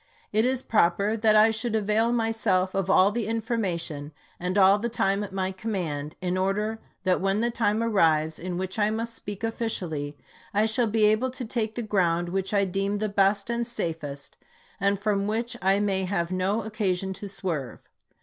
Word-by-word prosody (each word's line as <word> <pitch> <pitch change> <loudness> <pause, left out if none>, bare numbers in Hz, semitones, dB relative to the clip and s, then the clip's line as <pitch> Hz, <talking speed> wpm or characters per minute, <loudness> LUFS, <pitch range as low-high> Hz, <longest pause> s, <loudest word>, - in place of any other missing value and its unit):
It 215 +2 +3
is 260 0 0
proper 200 +1 +2
that 215 -1 +3
I 215 +1 +6
should 225 +1 -2
avail 220 +2 +2
myself 225 -5 +1
of 195 -1 -1
all 190 +1 +5
the 225 -1 -2
information 180 -10 -2 0.3
and 180 +2 -2
all 195 +1 +6
the 235 +3 -2
time 200 -3 +1
at 205 - -7
my 190 0 -1
command, 175 -8 -4
in 180 0 0
order 210 +4 -1 0.2
that 185 -2 +2
when 195 +2 +1
the 235 +1 +1
time 225 -1 +1
arrives 160 -8 +2
in 180 0 -4
which 185 +3 -3
I 210 0 +3
must 230 +1 -3
speak 205 -1 -7
officially, 175 -11 -2 0.4
I 210 +1 +4
shall 225 +2 +2
be 215 0 +3
able 215 +5 +3
to 255 0 -5
take 220 -1 -2
the 240 - -3
ground 175 -5 +1
which 190 +1 -2
I 200 -1 +3
deem 195 +2 -1
the 215 +1 -1
best 200 0 +2
and 235 0 -1
safest, 160 - -4 0.4
and 200 0 +1
from 200 -1 0
which 230 +3 -2
I 195 +2 +3
may 195 -2 0
have 180 -2 -1
no 190 +4 0
oc 220 - -8
casion 190 -2 0
to 200 +1 -7
swerve. 165 -9 -4
200 Hz, 190 wpm, -26 LUFS, 185-220 Hz, 0.4 s, I